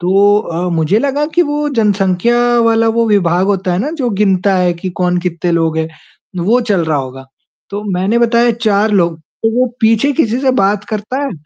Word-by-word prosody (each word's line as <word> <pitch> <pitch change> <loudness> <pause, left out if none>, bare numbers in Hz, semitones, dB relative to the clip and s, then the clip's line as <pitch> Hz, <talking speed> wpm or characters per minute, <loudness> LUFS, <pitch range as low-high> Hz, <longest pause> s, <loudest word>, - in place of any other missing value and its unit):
तो 200 +3 +3
अ, 175 -3 -3
मुझे 165 +6 +1
लगा 285 +3 -1
कि 350 - +4
वो 295 -1 -2
जनसंख्या 210 -2 +1 0.2
वाला 230 0 +2
वो 230 - +2
विभाग 185 -3 +2
होता 190 -2 -1
है 175 - -1
ना, 275 +9 -2
जो 275 -7 -2
गिनता 195 -1 +1
है 180 -1 +1
कि 175 +2 -6
कौन 180 0 +1
कितने 175 -1 -3
लोग 165 -1 0
हैं, 160 - -2 0.6
वो 240 +5 +3
चल 200 -7 0
रहा 155 -2 0
होगा। 135 0 -7 0.4
तो 205 +1 -5
मैंने 190 +6 0
बताया 235 0 +3 0.2
4 210 +1 +2
लोग। 170 -5 +1 0.2
तो 225 - +2
वो 255 - +3
पीछे 225 +5 +2
किसी 245 -5 0
से 265 -1 +2
बात 200 +1 +1
करता 215 +5 -4
है 280 - -2
205 Hz, 200 wpm, -14 LUFS, 180-235 Hz, 0.6 s, कि